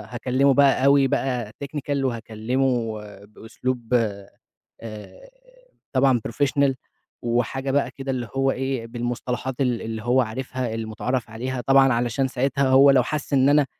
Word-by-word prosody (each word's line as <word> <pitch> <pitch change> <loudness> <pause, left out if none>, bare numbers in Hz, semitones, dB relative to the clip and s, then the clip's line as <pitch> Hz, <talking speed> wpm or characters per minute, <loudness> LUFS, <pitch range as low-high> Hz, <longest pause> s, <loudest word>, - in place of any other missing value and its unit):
هاكلمه 130 +3 +2
بقى 140 -1 +4
أوي 140 -1 +5
بقى 125 -5 -1
technical 140 -1 -3
وهاكلمه 115 0 -1 0.3
بأسلوب، 120 +3 -5 0.9
آآ، 115 - -10 0.6
طبعًا 130 -3 +3
professional 140 +2 +1 0.5
وحاجة 120 +3 -1
بقى 145 +1 +1
كده 135 0 -5
اللي 125 -3 -3
هو 135 0 +2
إيه، 130 -3 -3
بالمصطلحات 120 +2 -4
ال 125 -3 0
اللي 110 0 -5
هو 125 +2 +3
عارفها، 125 +1 -4
المتعارف 115 +2 -3
عليها 125 +3 -4
طبعًا 135 -1 +4
علشان 120 +3 0
ساعتها 135 +2 0
هو 135 +2 +7
لو 130 -2 +4
حس 145 +2 -4
إن 135 +1 +4
أنا 145 -1 +4
130 Hz, 135 wpm, -23 LUFS, 120-135 Hz, 0.9 s, هو